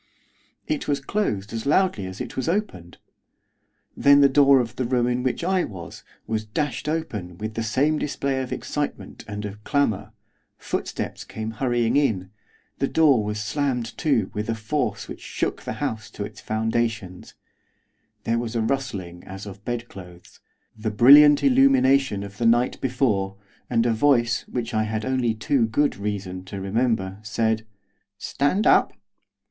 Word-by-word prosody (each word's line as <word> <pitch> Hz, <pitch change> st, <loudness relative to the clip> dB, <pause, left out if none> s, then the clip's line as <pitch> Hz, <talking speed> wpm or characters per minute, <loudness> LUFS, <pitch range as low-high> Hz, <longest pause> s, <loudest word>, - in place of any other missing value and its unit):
It 305 Hz, -2 st, -2 dB
was 145 Hz, -1 st, +1 dB
closed 125 Hz, -, -2 dB
as 115 Hz, +3 st, -4 dB
loudly 145 Hz, -, +2 dB
as 95 Hz, +1 st, -8 dB
it 125 Hz, -2 st, -6 dB
was 130 Hz, -, -2 dB
opened. 130 Hz, -, -3 dB, 1.0 s
Then 140 Hz, 0 st, +6 dB
the 140 Hz, -, +7 dB
door 140 Hz, 0 st, +5 dB
of 120 Hz, -2 st, -3 dB
the 130 Hz, -, 0 dB
room 120 Hz, 0 st, +1 dB
in 125 Hz, 0 st, 0 dB
which 130 Hz, +5 st, -1 dB
I 185 Hz, 0 st, +2 dB
was, 85 Hz, -6 st, -8 dB, 0.2 s
was 110 Hz, -1 st, -2 dB
dashed 140 Hz, +5 st, -3 dB
open, 105 Hz, -, -4 dB
with 110 Hz, +2 st, -5 dB
the 115 Hz, -, -3 dB
same 140 Hz, +8 st, +1 dB
display 135 Hz, -2 st, -1 dB
of 130 Hz, -, -6 dB
excitement, 145 Hz, -1 st, -4 dB
and 105 Hz, 0 st, -5 dB
of 105 Hz, +1 st, -8 dB
clamour, 140 Hz, -8 st, 0 dB, 0.5 s
footsteps -, -, -4 dB
came 110 Hz, 0 st, -6 dB
hurrying 120 Hz, +1 st, +1 dB
in, 105 Hz, -10 st, 0 dB, 0.5 s
the -, -, +1 dB
door 145 Hz, -8 st, +4 dB
was 105 Hz, 0 st, -3 dB
slammed 125 Hz, 0 st, -2 dB
to 125 Hz, -, +1 dB
with 105 Hz, +2 st, -4 dB
a 115 Hz, -, 0 dB
force 110 Hz, +7 st, -2 dB
which -, -, -9 dB
shook -, -, -3 dB
the -, -, -5 dB
house 110 Hz, +1 st, -4 dB
to 100 Hz, -, -3 dB
its 105 Hz, -, -11 dB
foundations, 110 Hz, -4 st, -2 dB, 0.9 s
there 115 Hz, +1 st, 0 dB
was 120 Hz, 0 st, -4 dB
a 115 Hz, -, +1 dB
rustling 110 Hz, -9 st, -3 dB
as 95 Hz, +2 st, -8 dB
of 100 Hz, 0 st, -10 dB
bed 120 Hz, 0 st, -3 dB
clothes, 90 Hz, -3 st, -13 dB, 0.4 s
the 110 Hz, 0 st, -3 dB
brilliant 145 Hz, +7 st, +7 dB
illumination 140 Hz, -, +4 dB
of 100 Hz, 0 st, -10 dB
the 115 Hz, -, +2 dB
night 120 Hz, +2 st, +2 dB
before, 105 Hz, -7 st, 0 dB, 0.3 s
and 115 Hz, -1 st, +2 dB
a 120 Hz, -, +2 dB
voice, 120 Hz, 0 st, +2 dB
which 120 Hz, -1 st, -4 dB
I 110 Hz, 0 st, +1 dB
had 110 Hz, 0 st, -3 dB
only 130 Hz, -3 st, 0 dB
too 120 Hz, +1 st, +1 dB
good 145 Hz, +6 st, +1 dB
reason 100 Hz, -3 st, -4 dB
to 100 Hz, +1 st, -7 dB
remember 100 Hz, -1 st, -1 dB
said, 110 Hz, +1 st, -1 dB, 0.5 s
'Stand 165 Hz, -, 0 dB
up. -, -, +4 dB
115 Hz, 165 wpm, -24 LUFS, 105-135 Hz, 1.0 s, the